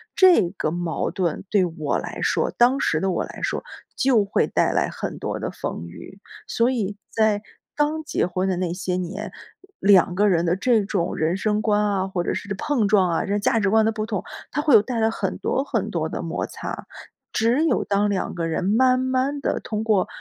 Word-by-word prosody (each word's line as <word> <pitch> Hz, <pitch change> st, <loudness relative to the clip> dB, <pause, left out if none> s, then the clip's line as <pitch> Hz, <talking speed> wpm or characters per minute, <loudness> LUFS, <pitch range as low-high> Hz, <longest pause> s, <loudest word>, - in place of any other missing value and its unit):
这 360 Hz, -, +6 dB
个 155 Hz, -, -1 dB
矛 170 Hz, -2 st, -2 dB
盾 175 Hz, -5 st, -2 dB
对 205 Hz, -3 st, +4 dB
我 150 Hz, -2 st, 0 dB
来 -, -, -7 dB
说， -, -, +1 dB
当 250 Hz, +3 st, +4 dB
时 155 Hz, -, +1 dB
的 190 Hz, 0 st, 0 dB
我 -, -, -1 dB
来 -, -, -9 dB
说， -, -, -1 dB, 0.3 s
就 245 Hz, -6 st, +3 dB
会 200 Hz, -, +1 dB
带 -, -, +1 dB
来 -, -, +1 dB
很 -, -, -5 dB
多 -, -, -3 dB
的 -, -, -3 dB
风 -, -, -5 dB
雨。 190 Hz, -, -12 dB, 0.3 s
所 235 Hz, +3 st, +2 dB
以 205 Hz, -4 st, -2 dB
在 215 Hz, -2 st, +1 dB, 0.3 s
刚 300 Hz, +2 st, 0 dB
结 295 Hz, -, 0 dB
婚 185 Hz, +2 st, -1 dB
的 180 Hz, -, 0 dB
那 175 Hz, -2 st, -1 dB
些 180 Hz, 0 st, -2 dB
年， 185 Hz, +4 st, -4 dB, 0.5 s
两 190 Hz, -2 st, +5 dB
个 205 Hz, +2 st, +3 dB
人 175 Hz, -3 st, +2 dB
的 170 Hz, -, +2 dB
这 220 Hz, +1 st, +2 dB
种 190 Hz, -3 st, -2 dB
人 165 Hz, +4 st, 0 dB
生 210 Hz, +1 st, 0 dB
观 210 Hz, -2 st, +2 dB
啊， 195 Hz, -2 st, 0 dB
或 180 Hz, -2 st, -2 dB
者 -, -, -1 dB
是 205 Hz, -, -6 dB
碰 275 Hz, -7 st, +1 dB
撞 195 Hz, -3 st, +4 dB
啊， 165 Hz, -, 0 dB
这 205 Hz, +1 st, 0 dB
价 220 Hz, +2 st, +2 dB
值 200 Hz, -2 st, +1 dB
观 220 Hz, +1 st, +4 dB
的 225 Hz, -, +2 dB
不 215 Hz, -1 st, -3 dB
同， 205 Hz, -3 st, -2 dB, 0.3 s
它 295 Hz, -, -1 dB
会 300 Hz, -5 st, +3 dB
有 215 Hz, -, +8 dB
带 230 Hz, +2 st, -3 dB
来 220 Hz, 0 st, +2 dB
很 -, -, -3 dB
多 270 Hz, -, -1 dB
很 -, -, -2 dB
多 -, -, -1 dB
的 -, -, -4 dB
摩 -, -, -3 dB
擦， -, -, -7 dB, 0.4 s
只 235 Hz, +7 st, +2 dB
有 265 Hz, -, +1 dB
当 205 Hz, +1 st, +1 dB
两 195 Hz, -, -2 dB
个 165 Hz, -2 st, -2 dB
人 165 Hz, -, -2 dB
慢 255 Hz, +5 st, +3 dB
慢 260 Hz, +2 st, 0 dB
地 -, -, -1 dB
通 215 Hz, 0 st, -4 dB
过 210 Hz, -4 st, +2 dB
205 Hz, 235 characters per minute, -23 LUFS, 185-230 Hz, 0.5 s, 有